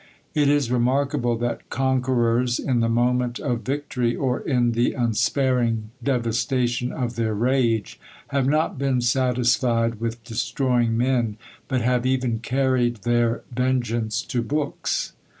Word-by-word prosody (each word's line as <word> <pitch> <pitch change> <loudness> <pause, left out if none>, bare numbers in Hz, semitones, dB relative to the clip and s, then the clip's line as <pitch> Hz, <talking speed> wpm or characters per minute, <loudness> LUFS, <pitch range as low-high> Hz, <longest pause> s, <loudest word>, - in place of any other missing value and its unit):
It 145 -2 +3
is 145 -4 +2
remarkable 125 0 +1
that 120 +1 -3
conquerors, 125 -2 +1
in 125 -3 0
the 115 0 +1
moment 125 +1 +1
of 125 -5 -2
victory, 125 -1 -1
or 130 -2 -1
in 125 -4 +1
the 120 +1 +1
unsparing 120 -1 0
devastation 125 0 0
of 120 -2 -3
their 110 -2 -1
rage, 115 -3 0 0.3
have 135 -2 +1
not 155 -1 +1
been 135 -3 +1
satisfied 120 -2 +1
with 115 0 -4
destroying 120 0 0
men, 120 -3 +1 0.3
but 130 -3 0
have 125 +1 +1
even 125 -3 0
carried 125 -2 0
their 120 -1 +1
vengeance 120 -3 0
to 120 - -2
books. 145 +4 -2
120 Hz, 130 wpm, -23 LUFS, 115-130 Hz, 0.3 s, It